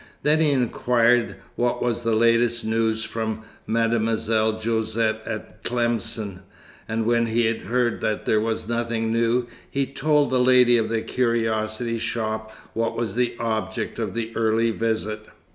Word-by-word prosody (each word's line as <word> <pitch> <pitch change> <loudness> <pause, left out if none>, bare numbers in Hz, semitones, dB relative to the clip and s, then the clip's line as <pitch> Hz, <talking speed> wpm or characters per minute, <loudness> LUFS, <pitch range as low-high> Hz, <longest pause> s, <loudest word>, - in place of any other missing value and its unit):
Then 150 +1 +4
he 160 -2 +4
inquired 120 -2 +2 0.2
what 120 0 0
was 120 -1 0
the 115 -1 +1
latest 115 +1 +3
news 110 0 +1
from 110 -1 -3 0.2
Mademoiselle 110 -1 +1
Josette 110 0 0
at 110 0 -7
Tlemcen; 115 -5 -1 0.5
and 110 0 -1
when 115 0 +2
he 115 0 +1
heard 120 +3 -1
that 105 - -1
there 110 - +2
was 110 -1 -2
nothing 115 -1 -1
new, 115 +2 +2 0.2
he 140 0 0
told 145 +1 +1
the 130 - +3
lady 125 -1 +5
of 110 -1 -1
the 115 -1 -1
curiosity 115 -1 -1
shop 110 -1 -3 0.2
what 115 0 -1
was 115 -4 -2
the 125 0 0
object 110 -2 -2
of - - -3
the 115 -1 -3
early 115 0 +2
visit. 110 -1 -2
115 Hz, 145 wpm, -24 LUFS, 110-120 Hz, 0.5 s, lady